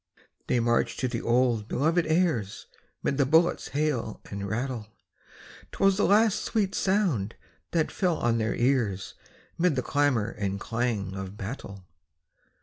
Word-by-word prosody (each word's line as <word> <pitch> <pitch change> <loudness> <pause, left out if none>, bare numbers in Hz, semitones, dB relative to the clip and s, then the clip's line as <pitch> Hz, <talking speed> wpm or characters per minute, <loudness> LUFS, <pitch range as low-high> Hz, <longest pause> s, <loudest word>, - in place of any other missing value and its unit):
They 125 - +2
marched 120 0 +1
to 130 - +1
the 120 -1 -3
old 120 -3 +2
belovèd 165 +5 +2
airs 155 - 0 0.4
'Mid 140 - 0
the 140 - +4
bullets' 165 +4 +3
hail 140 -7 -1
and 100 0 -4
rattle; 120 0 -3 0.8
'Twas 195 -1 +2
the 205 - +3
last 210 +1 +4
sweet 205 -4 0
sound 180 - +1 0.3
that 165 -2 0
fell 180 -4 0
on 115 -1 +1
their 110 0 0
ears 115 -8 0 0.5
'Mid 175 -3 +3
the 125 - -1
clamor 140 -7 +1
and 100 -1 -3
clang 115 -4 -2
of 95 +1 -6
battle. 100 -3 -7
125 Hz, 145 wpm, -27 LUFS, 105-160 Hz, 0.8 s, the